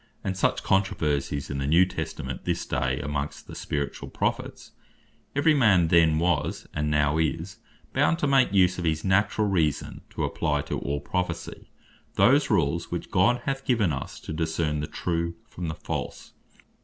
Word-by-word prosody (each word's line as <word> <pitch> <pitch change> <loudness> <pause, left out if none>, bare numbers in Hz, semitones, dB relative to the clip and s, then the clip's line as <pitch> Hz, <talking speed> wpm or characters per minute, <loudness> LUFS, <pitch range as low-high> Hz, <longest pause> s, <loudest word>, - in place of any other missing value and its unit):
and 95 - -2
such 95 - +1
controversies 75 -8 0
in 70 - -3
the 70 - -2
New 85 +5 +5
Testament 65 -7 -5
at - - -27
this - - -1
day, 65 +2 -1
amongst 75 0 -4
the - - -11
Spirituall 70 -1 -4
Prophets: - - -3 0.6
Every 145 +2 +4
man 100 - +4
then 80 -2 +5
was, 85 +2 0
and 75 0 -1
now 75 +1 +2
is 85 +6 -2 0.3
bound 145 +4 +3
to 160 - -1
make 135 -5 +4
use 95 -2 +3
of - - -3
his 80 -2 0
Naturall 100 +2 +2
Reason, 80 -7 0
to - - -4
apply - - 0
to - - -4
all 70 0 -3
Prophecy 90 +5 -4 0.5
those 140 +2 +4
Rules 80 +2 +1
which 85 - -5
God 115 +7 +3
hath 135 -1 -2
given 110 - +2
us, 65 - -6
to - - -6
discern 80 -1 -1
the 75 - -3
true 85 -1 -2
from 90 -1 -6
the 80 - -3
false. - - -5
85 Hz, 170 wpm, -26 LUFS, 75-100 Hz, 0.6 s, New